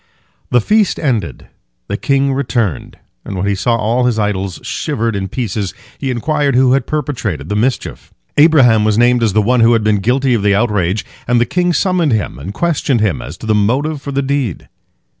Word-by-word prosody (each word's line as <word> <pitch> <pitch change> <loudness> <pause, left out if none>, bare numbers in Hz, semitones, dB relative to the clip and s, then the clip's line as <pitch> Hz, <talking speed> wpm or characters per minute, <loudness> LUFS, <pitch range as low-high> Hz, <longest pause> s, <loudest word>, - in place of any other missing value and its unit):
The 125 - +3
feast 210 - +1
ended, 115 - -2 0.4
the - - -2
king 140 0 +1
returned, 120 - -2 0.3
and 100 - -6
when 90 - -1
he 100 - +1
saw 115 +5 0
all 115 +3 0
his 120 -3 +1
idols 100 -3 -2
shivered 115 -1 -2
in 95 -1 -2
pieces, 105 -3 -3 0.2
he 135 - -3
inquired 140 +2 0
who 130 0 +4
had 135 -2 0
perpetrated 120 - -3
the 105 - -1
mischief. 120 +5 -2 0.2
Abraham 135 -8 +5
was 105 -1 +1
named 120 +1 +3
as 110 -4 +1
the 105 0 +3
one 125 +4 +2
who 115 +1 +5
had 115 -2 +1
been 105 -1 +2
guilty 125 +5 +1
of 115 - +1
the 100 0 +2
outrage, 105 -3 0 0.2
and 120 0 +3
the 120 - +3
king 180 +6 0
summoned 175 -5 +1
him 105 - -2
and 85 +8 -6
questioned 145 -1 0
him 105 -4 0
as 75 - -8
to - - -10
his 110 -1 +1
motive 135 +9 0
for 140 - -6
the 140 0 -1
deed. 135 -4 -2
120 Hz, 200 wpm, -15 LUFS, 105-135 Hz, 0.4 s, Abraham